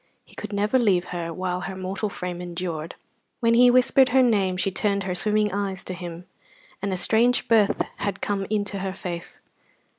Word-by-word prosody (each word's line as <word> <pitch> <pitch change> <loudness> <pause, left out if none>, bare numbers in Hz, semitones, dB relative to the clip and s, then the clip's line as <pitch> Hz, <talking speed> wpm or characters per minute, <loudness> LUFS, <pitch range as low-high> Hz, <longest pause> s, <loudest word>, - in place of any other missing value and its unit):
He - - -21
could - - -7
never 210 +5 +1
leave 190 -7 +2
her 170 -1 -3
while 180 +1 -3
her 190 0 -5
mortal 190 +3 -3
frame 180 -2 -5
endured. 170 -2 -5 0.4
When 230 -1 +3
he 245 +1 +7
whispered 255 +1 +5
her 260 +1 +5
name 195 -6 +2
she 195 +1 0
turned 200 0 0
her 185 -1 -2
swimming 210 +2 +1
eyes 195 -2 -2
to 185 - -5
him, 175 -1 -8 0.6
and 200 0 -2
a 185 - -1
strange 235 +6 +3
birth 220 -3 +3
had 200 -1 -3
come 195 -2 -2
into 205 -2 -1
her 190 0 -3
face. 175 -3 -7
195 Hz, 185 wpm, -24 LUFS, 180-215 Hz, 0.6 s, he